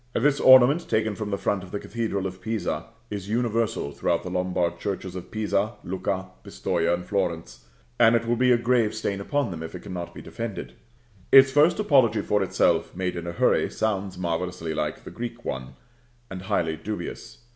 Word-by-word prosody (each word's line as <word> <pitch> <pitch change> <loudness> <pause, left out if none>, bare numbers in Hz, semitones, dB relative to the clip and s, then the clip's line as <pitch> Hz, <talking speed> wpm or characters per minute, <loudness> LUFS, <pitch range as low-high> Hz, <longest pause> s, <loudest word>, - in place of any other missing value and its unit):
This 145 0 +2
ornament, 130 +5 +6
taken 110 -1 +1
from 105 0 -5
the 100 - -1
front 100 -1 -1
of 95 - -11
the 100 - -3
Cathedral 110 -3 -3
of 95 0 -5
Pisa, 110 -2 -3 0.2
is 100 -1 -5
universal 115 -7 0
throughout - - -1
the - - -6
Lombard 90 -1 -1
churches 95 -2 -4
of 90 - -7
Pisa, 110 0 0
Lucca, 95 +1 -3
Pistoja, 85 0 -1
and 90 +1 -1
Florence; 85 -10 -3 0.3
and 115 +1 +6
it 115 0 +1
will 120 +1 +1
be 125 +1 +3
a 120 - +6
grave 120 -2 +1
stain 100 -2 -2
upon 140 +1 -1
them 85 -2 -6
if 80 +2 -7
it 90 - -7
cannot 90 -2 -6
be - - -8
defended. 115 -3 -6 0.6
Its 135 0 +8
first 150 +5 +4
apology 140 - +4
for 105 -1 +1
itself, 95 - +1
made 90 0 -2
in 85 0 -5
a - - -2
hurry, 85 - +2
sounds 100 -3 -2
marvellously 85 -1 -3
like - - -3
the - - -9
Greek 120 0 -7
one, 65 0 -5 0.6
and 95 -1 -6
highly 80 -3 0
dubious. 105 +5 -7
100 Hz, 190 wpm, -25 LUFS, 90-115 Hz, 0.6 s, Its